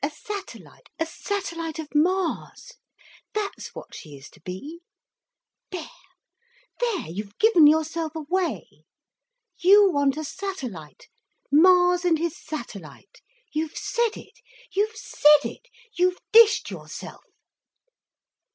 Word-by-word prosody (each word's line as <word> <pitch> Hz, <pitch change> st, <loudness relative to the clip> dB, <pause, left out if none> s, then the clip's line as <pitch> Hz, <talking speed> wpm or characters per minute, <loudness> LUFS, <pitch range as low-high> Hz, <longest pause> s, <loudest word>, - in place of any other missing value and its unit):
A 285 Hz, -, +1 dB
satellite—a 370 Hz, 0 st, -8 dB
satellite 335 Hz, -2 st, -4 dB
of 315 Hz, -2 st, -7 dB
Mars—that's 380 Hz, +5 st, -3 dB
what -, -, -10 dB
she 150 Hz, -4 st, -10 dB
is 135 Hz, -, -14 dB
to -, -, -20 dB
be! 235 Hz, -, -8 dB, 0.9 s
There—there—you've 415 Hz, -, -7 dB
given 370 Hz, -9 st, +6 dB
yourself 315 Hz, +1 st, +1 dB
away! 340 Hz, +3 st, -3 dB, 0.7 s
You 395 Hz, +2 st, +6 dB
want 285 Hz, -2 st, +1 dB
a 310 Hz, -, -3 dB
satellite, 260 Hz, -, -7 dB, 0.4 s
Mars 355 Hz, +3 st, +5 dB
and 340 Hz, -3 st, +3 dB
his 335 Hz, 0 st, -2 dB
satellite! 235 Hz, -, -9 dB, 0.3 s
You've 310 Hz, 0 st, -3 dB
said 470 Hz, -2 st, -1 dB
it—you've 425 Hz, +3 st, -5 dB
said 300 Hz, -7 st, +4 dB
it—you've 365 Hz, -7 st, -3 dB
dished 455 Hz, 0 st, +6 dB
yourself!" -, -, -9 dB
335 Hz, 95 wpm, -25 LUFS, 300-405 Hz, 0.9 s, given